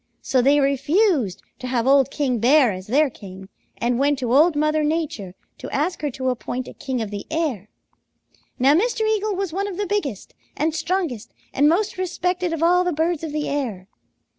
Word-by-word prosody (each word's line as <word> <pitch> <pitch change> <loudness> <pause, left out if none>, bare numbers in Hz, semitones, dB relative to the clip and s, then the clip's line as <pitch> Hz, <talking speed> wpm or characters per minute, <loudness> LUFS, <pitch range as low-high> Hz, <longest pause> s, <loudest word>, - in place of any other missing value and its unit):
So 260 - +2
they 280 +3 +4
refused 280 - +1 0.2
to 255 - -6
have 245 -2 0
old 275 0 +4
King 265 -5 -1
Bear 255 +1 +5
as 185 0 -7
their 290 +7 +3
king 190 -2 -11 0.3
and 240 +1 0
went 285 +1 +2
to 250 -2 -2
Old 310 +4 +5
Mother 305 +1 +1
Nature 295 - -2 0.2
to - - -7
ask 325 +6 -1
her 295 - -1
to 260 0 -2
appoint 250 0 -4
a - - -9
king 255 -4 -3
of 210 - -7
the 205 -1 -6
air. 295 - -2 0.9
Now 270 +3 +4
Mr. 440 +5 +1
Eagle 430 -1 0
was 380 -3 -3
one 395 +2 -1
of 380 -3 -6
the 410 - -1
biggest 345 - -3 0.2
and 310 +2 0
strongest 330 - -3 0.2
and 290 +2 +4
most 380 +3 0
respected 360 -1 -1
of 330 -1 -2
all 360 +2 +4
the 360 - 0
birds 325 +1 -1
of 320 - -4
the 300 0 -2
air. 230 -10 -3
290 Hz, 195 wpm, -22 LUFS, 250-345 Hz, 0.9 s, Bear